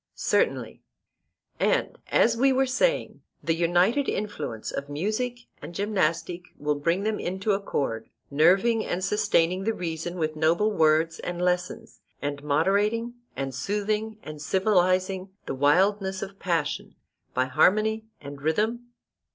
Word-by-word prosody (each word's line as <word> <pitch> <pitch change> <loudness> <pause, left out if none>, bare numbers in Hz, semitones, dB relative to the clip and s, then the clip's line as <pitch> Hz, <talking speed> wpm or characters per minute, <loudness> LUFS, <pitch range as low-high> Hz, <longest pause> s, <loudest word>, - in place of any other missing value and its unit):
Certainly. - - 0 0.8
And, - - +1
as 230 - +4
we 270 +3 +4
were 265 +1 +3
saying, - - 0 0.2
the 165 - +1
united 175 - +2
influence 155 - -4
of 140 +1 -5
music 215 +11 -2 0.2
and 165 +4 -9
gymnastic 180 -3 -1
will 150 +1 0
bring 165 +6 0
them 215 0 -1
into 190 +4 -1
accord, 135 - -2 0.2
nerving 190 +10 +4
and 180 +1 -3
sustaining 195 -3 +2
the 225 +2 0
reason 170 0 -4
with 155 -2 -1
noble 165 +7 +2
words 160 -2 +2
and 175 -1 -4
lessons, 180 0 -2 0.2
and 145 0 -3
moderating 200 +10 +1 0.2
and 135 -1 -3
soothing 210 - -2
and 155 -1 -8
civilizing 185 +1 +1 0.2
the - - -3
wildness 190 +8 +2
of 195 0 -9
passion 165 -5 -2 0.4
by 130 - +2
harmony 215 +10 +2
and 140 -1 -9
rhythm? 220 +10 0
185 Hz, 130 wpm, -26 LUFS, 155-210 Hz, 0.8 s, as